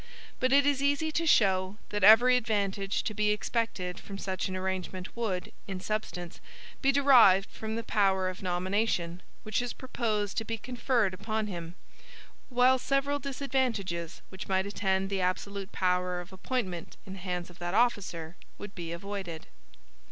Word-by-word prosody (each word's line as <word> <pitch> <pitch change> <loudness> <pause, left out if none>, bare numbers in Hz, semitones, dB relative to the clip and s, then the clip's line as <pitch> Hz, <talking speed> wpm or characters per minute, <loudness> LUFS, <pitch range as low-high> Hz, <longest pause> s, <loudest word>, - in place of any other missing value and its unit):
But 255 0 +2
it 280 +1 +6
is 285 -1 +2
easy 285 +3 +1
to 330 +1 0
show, 190 -6 +3
that 205 -2 -2
every 230 +5 +8
advantage 200 -4 0
to 215 - -3
be 210 0 +1
expected 210 -4 -1
from 195 - -8
such 190 -2 -2
an 185 - -4
arrangement 185 -1 -4
would, 210 -6 -2 0.2
in 190 -2 -4
substance, 185 -4 -4 0.4
be 275 - +4
derived 250 -9 +6
from 220 0 -5
the 230 - -3
power 195 -4 +2
of 185 0 -5
nomination, 180 -1 -1 0.2
which 215 +3 0
is 245 -1 -3
proposed 215 -6 -2
to 225 - +1
be 225 +1 -3
conferred 235 -3 0
upon 215 +3 -2
him; 170 -4 -6 0.7
while 255 +1 +4
several 275 +2 0
disadvantages 245 - -2
which 190 0 -8
might 190 0 +1
attend 195 -1 0
the 195 -1 0
absolute 195 +2 -2
power 180 -1 0
of 180 +1 -10
appointment 190 -4 -3
in 190 - -8
the 195 - -8
hands 180 -1 -4
of 175 - -18
that 175 +2 -3
officer 185 -8 0 0.2
would 205 -1 -8
be 170 -3 -6
avoided. 175 -2 -5
200 Hz, 160 wpm, -29 LUFS, 185-235 Hz, 0.7 s, every